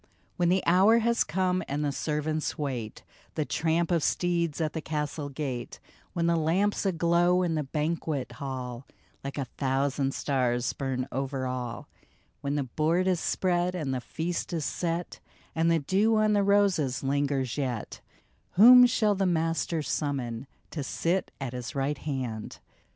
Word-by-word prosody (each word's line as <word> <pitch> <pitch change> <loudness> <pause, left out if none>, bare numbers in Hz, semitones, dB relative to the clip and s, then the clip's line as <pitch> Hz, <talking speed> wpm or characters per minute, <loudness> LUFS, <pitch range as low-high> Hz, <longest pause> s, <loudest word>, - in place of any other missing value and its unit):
When 175 -1 +2
the 185 +1 +2
hour 195 +6 +5
has 235 +1 +2
come 185 +1 0
and 145 +2 -1
the 145 - 0
servants 155 +2 -2
wait 125 -7 -4 0.3
The 155 - 0
tramp 165 +3 0
of 170 -2 +2
steeds 170 -3 0
at 155 -2 -1
the 160 - -3
castle 150 -1 -3
gate, 130 -4 -5 0.3
When 170 -1 0
the 170 0 +3
lamps 185 +6 +1
aglow 175 +1 +3
in 170 -2 0
the 155 - 0
banquet 150 -1 -2
hall 130 -3 -6 0.4
Like 140 +1 -5
a 140 - -1
thousand 135 +1 -1
stars 125 -3 0
burn 130 -2 -3
over 135 0 -2
all, 125 -2 -4 0.5
When 140 0 -2
the 145 - 0
board 160 +7 +1
is 185 -2 +2
spread 180 0 0
and 150 -7 -2
the 130 - -2
feast 170 +6 -3
is 160 -4 -1
set, 170 0 -3 0.3
And 165 +1 +2
the 165 - +4
dew 195 +9 +2
on 215 -1 +3
the 205 - +3
roses 195 -10 +2
lingers 135 -2 0
yet, 125 -6 -3 0.5
Whom 245 +5 +9
shall 215 -3 +2
the 195 -1 0
Master 165 -1 0
summon 135 -5 -2 0.2
To 155 - -4
sit 175 +7 -1
at 135 -3 -4
his 125 +3 -6
right 140 +1 -1
hand 125 -7 -4
155 Hz, 160 wpm, -28 LUFS, 135-175 Hz, 0.5 s, Whom